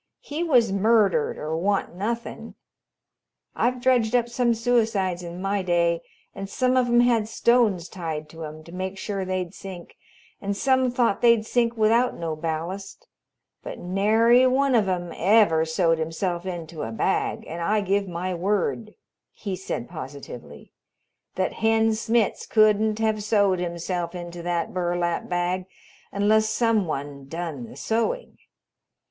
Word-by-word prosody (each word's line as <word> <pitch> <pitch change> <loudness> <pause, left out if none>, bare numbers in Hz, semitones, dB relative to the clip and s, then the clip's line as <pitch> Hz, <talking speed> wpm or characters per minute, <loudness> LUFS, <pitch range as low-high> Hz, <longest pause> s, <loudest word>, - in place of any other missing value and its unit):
He 305 +4 -4
was 245 - +3
murdered 200 -4 +2
or 155 +1 -3
wan't 195 +3 0
nothin'! 230 +5 -4 1.0
I've 250 +1 +1
dredged 245 -2 +2
up 240 -1 +2
some 235 -1 +1
suicides 220 -6 +1
in 175 0 -7
my 200 0 0
day, 170 -2 +1 0.3
and 195 0 -7
some 255 +4 +1
of 255 -1 +3
'em 240 0 +4
had 235 -3 +2
stones 225 -6 +2
tied 160 -4 -5
to 160 +1 -9
'em, 155 0 -8
to 170 - -13
make 185 +2 -4
sure 195 0 -3
they'd 185 -2 -3
sink, 185 -3 -10 0.4
and 200 0 -2
some 260 0 +2
thought 240 -4 +1
they'd 235 -2 +4
sink 235 0 0
without 230 +3 +3
no 165 -2 -3
ballast, 165 +5 -5 0.6
but - - -7
nary 220 +7 +4
one 270 +1 +2
of 215 -5 +3
'em 175 -2 -2
ever 190 -4 +4
sewed 165 0 +1
himself 170 +3 -2
into 170 -3 -6
a 110 - -4
bag, 110 - -1
and 170 +2 -6
I 210 +5 +1
give 200 0 0
my 180 +1 -3
word," 205 +4 -1 0.4
he 195 -3 -5
said 180 -10 -5
positively, 130 - -9 0.6
"that 185 - -1
Hen 225 0 +3
Smitz 225 0 0
couldn't 215 0 +3
have 220 -1 0
sewed 200 -3 +2
himself 175 0 -3
into 175 -1 -7
that 170 -1 -2
burlap 175 -1 -1
bag 180 +1 -1 0.4
unless 215 +2 +2
some 225 -4 +1
one 140 -2 -5
done 160 -6 -5
the - - -12
sewing. 230 - -2
195 Hz, 150 wpm, -24 LUFS, 170-225 Hz, 1.0 s, em